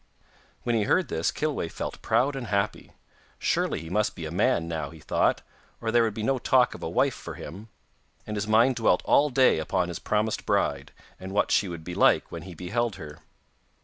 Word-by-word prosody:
When 120 - 0
he 105 -2 +1
heard 185 - +2
this 80 +1 0
Kilweh 150 - -2
felt - - -6
proud 135 +3 +1
and 130 -3 -5
happy. 100 0 -2 0.4
Surely - - 0
he 80 - -9
must 105 +2 0
be 85 - -6
a 80 - -5
man 90 -2 +1
now, 80 -4 -3
he 80 +1 -13
thought, - - +1 0.4
or 115 -1 -2
there 120 +1 +4
would 110 -2 0
be 110 - -4
no 135 +3 +1
talk 125 +1 +3
of - - -10
a - - -3
wife - - +2
for - - -8
him, 100 +9 -9 0.6
and 105 - -5
his 105 +1 -2
mind 115 +4 +4
dwelt 110 -6 +2
all 150 +1 +4
day 130 - +4
upon 90 +3 -1
his 85 - -5
promised 105 +1 -1
bride, 70 0 0 0.3
and 95 +1 -7
what 105 - +1
she 100 - +3
would 85 -2 -7
be 90 - -6
like - - +3
when - - -6
he 95 -2 -10
beheld 110 +6 -2
her. 75 -4 -10
105 Hz, 215 wpm, -26 LUFS, 85-120 Hz, 0.6 s, there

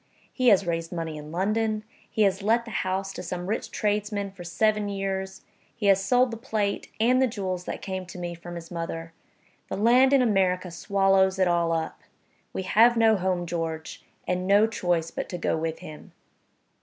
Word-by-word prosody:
He 255 -1 +1
has 200 -4 +6
raised 165 -1 -2
money 165 -3 -4
in 150 0 -9
London; 215 +4 0 0.3
he 220 - +1
has 195 0 +2
let 230 +4 +2
the 230 - -8
house 195 0 -2
to - - -6
some 180 0 -5
rich 210 +4 -2
tradesman 210 -1 -1
for 190 -2 -11
seven 210 +4 +1
years; 190 -1 -3 0.3
he 215 - -4
has 195 -1 +4
sold 250 +5 +3
the 230 - -5
plate, 215 -4 -2
and 250 +3 +4
the 260 - +4
jewels 185 -5 -4
that - - -5
came 190 -2 -4
to 180 - -9
me 175 -1 -4
from 175 +1 -9
his 170 0 -9
mother. 165 -1 -5 0.6
The - - -3
land 245 +5 +5
in 275 -2 +5
America 185 -5 +1
swallows 195 +1 +2
it 185 -1 +3
all 170 -1 +2
up. 160 -1 -2 0.5
We 190 - -4
have 230 +5 +5
no 225 -1 +5
home, 185 -2 -1
George, 165 -2 -4 0.2
and 180 0 -1
no 200 +2 +6
choice 175 -7 -1
but - - -5
to 180 - -4
go 170 - 0
with 160 0 -2
him." 155 -1 -11
190 Hz, 195 wpm, -26 LUFS, 175-215 Hz, 0.6 s, has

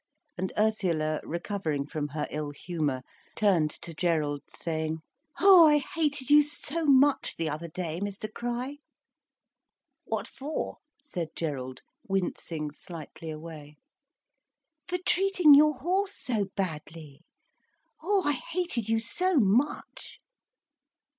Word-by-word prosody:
And 185 - -3
Ursula, 175 -8 +1
recovering 170 -4 -3
from 150 0 -3
her 150 +1 -3
ill 150 -1 -3
humour, 145 -3 -3 0.3
turned 180 -8 +3
to 170 - -6
Gerald 155 -4 0
saying: 160 -1 -3 0.4
"Oh, 370 -4 +9
I 295 -1 +6
hated 295 -4 -1
you 295 0 +9
so 295 +2 -3
much 280 +1 +4
the 165 - -1
other 155 +3 -4
day, 165 0 -4
Mr 205 +1 -4
Crich," 245 +4 -4 1.3
"What - - -2
for?" 290 +3 -4 0.3
said 175 - -5
Gerald, 130 -5 -4 0.2
wincing 170 -5 -2
slightly 160 +1 -9
away. 155 -1 -8 1.1
"For 360 0 -1
treating 370 -5 +5
your 300 +1 +7
horse 375 +9 0
so 220 -5 -1
badly. 155 -5 -5 0.8
Oh, 390 +3 +2
I 290 - +3
hated 275 - -2
you 225 - +3
so 360 +12 0
much!" 235 +7 0
195 Hz, 115 wpm, -28 LUFS, -, 1.3 s, Oh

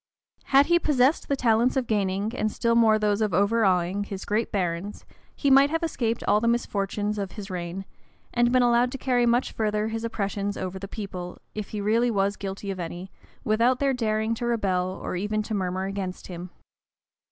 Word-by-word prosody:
Had 275 +1 +5
he 345 +2 +4
possessed 285 -2 +2
the 280 - +1
talents 240 0 +2
of 260 - +1
gaining, 205 +1 -1
and 215 -3 0
still 230 +2 +1
more 225 -2 +5
those 210 0 +1
of 210 -6 +1
overawing, 200 -2 +2
his 195 -1 -7
great 215 +2 -1
barons, 185 +1 -3 0.3
he 280 - +1
might 275 +1 +7
have 325 +2 -1
escaped 235 -8 -1
all 210 - +3
the 230 - +1
misfortunes 210 -2 -1
of 195 -2 -4
his 200 -2 -8
reign, 180 +1 -5 0.5
and 240 0 +3
been 255 0 +4
allowed 240 +1 +3
to - - -3
carry 245 -2 +1
much 240 +2 +2
further 215 0 -1
his 225 0 -4
oppressions 200 -2 -2
over 190 0 -4
the 195 - -6
people, 185 -4 -6 0.2
if 210 -2 -5
he 210 - -4
really 230 +4 +2
was 200 -2 +1
guilty 195 0 -5
of 190 - -6
any, 175 +2 -6 0.3
without 230 +4 +2
their 275 0 +1
daring 220 -2 0
to 235 +1 -3
rebel, 195 -6 0
or 185 - -5
even 210 +3 -1
to 220 - -5
murmur 185 -1 -1
against 195 -2 -5
him. 180 0 -7
215 Hz, 195 wpm, -26 LUFS, 195-235 Hz, 0.5 s, might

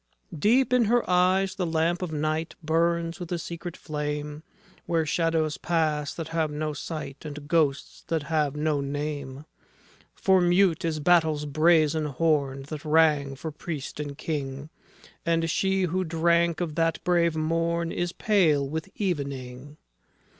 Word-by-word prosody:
Deep 245 - +3
in 250 -2 +4
her 240 +3 +2
eyes 185 +1 +3
the 190 - -3
lamp 165 +2 0
of 180 -3 -3
night 155 +1 -2
Burns 165 +2 0
with 175 -1 -7
a 175 - 0
secret 170 +1 -7
flame, 150 0 -4 0.5
Where 165 -2 +1
shadows 160 -1 0
pass 155 -4 0
that 165 -2 -5
have 165 -1 0
no 150 +1 -3
sight, 145 -2 -6
And 150 -1 -8
ghosts 150 -4 0
that 160 -3 -1
have 150 -3 0
no 150 -1 0
name. 145 0 -4 0.7
For 190 -1 +3
mute 175 0 +3
is 160 -2 -1
battle's 155 -2 +3
brazen 155 +1 +3
horn 140 -2 0
That 145 +1 -7
rang 150 -3 +3
for 155 +4 -6
Priest 150 -1 -6
and 145 -1 -5
King, 145 -2 -4 0.5
And 165 0 +1
she 190 +1 +1
who 185 +1 0
drank 170 0 +2
of 165 -3 -2
that 165 0 0
brave 170 -2 +2
morn 165 +1 0
Is 175 0 -2
pale 165 -10 +2
with 160 +5 -4
evening. 140 -6 -4
160 Hz, 145 wpm, -26 LUFS, 150-170 Hz, 0.7 s, in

